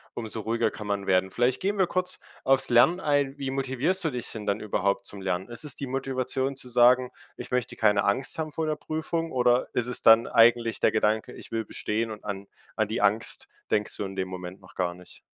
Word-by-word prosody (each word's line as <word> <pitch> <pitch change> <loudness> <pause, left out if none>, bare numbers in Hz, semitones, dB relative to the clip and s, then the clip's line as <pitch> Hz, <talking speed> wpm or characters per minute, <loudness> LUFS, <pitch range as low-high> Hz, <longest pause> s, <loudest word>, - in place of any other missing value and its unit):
umso 110 -1 -5
ruhiger 115 0 0
kann 105 -1 -8
man 100 -1 -1
werden. 95 0 +2
Vielleicht 120 +5 +1
gehen 200 +2 0
wir 190 - +4
kurz 180 +1 -3 0.2
auf's 135 0 +3
Lernen 130 +10 +5
ein. 145 -3 +1
Wie 135 -1 -3
motivierst 135 +8 0
du 160 - +1
dich 125 -3 -5
denn 105 -2 -7
dann 100 +1 +1
überhaupt 100 -2 0
zum 100 -1 -8
Lernen? 95 +1 -2
Ist 120 +4 -7
es 150 - -5
die 140 - -4
Motivation 135 0 -2
zu 125 -2 -9
sagen: 125 +1 +5 0.3
„Ich - - -8
möchte 125 -1 -1
keine 105 -2 +3
Angst 130 +9 0
haben 155 -1 -2
vor 160 +1 -2
der 155 - 0
Prüfung,“ 160 +2 -3
oder 125 -1 +3
ist 120 - 0
es 125 - -3
dann 115 +1 +7
eigentlich 115 0 +4
der - - +3
Gedanke, 110 0 0
„Ich - - -11
will 115 -1 -2
bestehen,“ 110 +3 -2
und 105 -1 -8
an 100 -1 -5 0.3
an 110 -2 +1
die 110 +1 -2
Angst 105 +3 +1 0.2
denkst 105 0 0
du 100 - -3
in 95 0 -7
dem 95 -1 -2
Moment 90 0 -7
noch 95 - -17
gar 90 -1 -1
nicht? 90 0 -16
120 Hz, 225 wpm, -27 LUFS, 105-135 Hz, 0.3 s, dann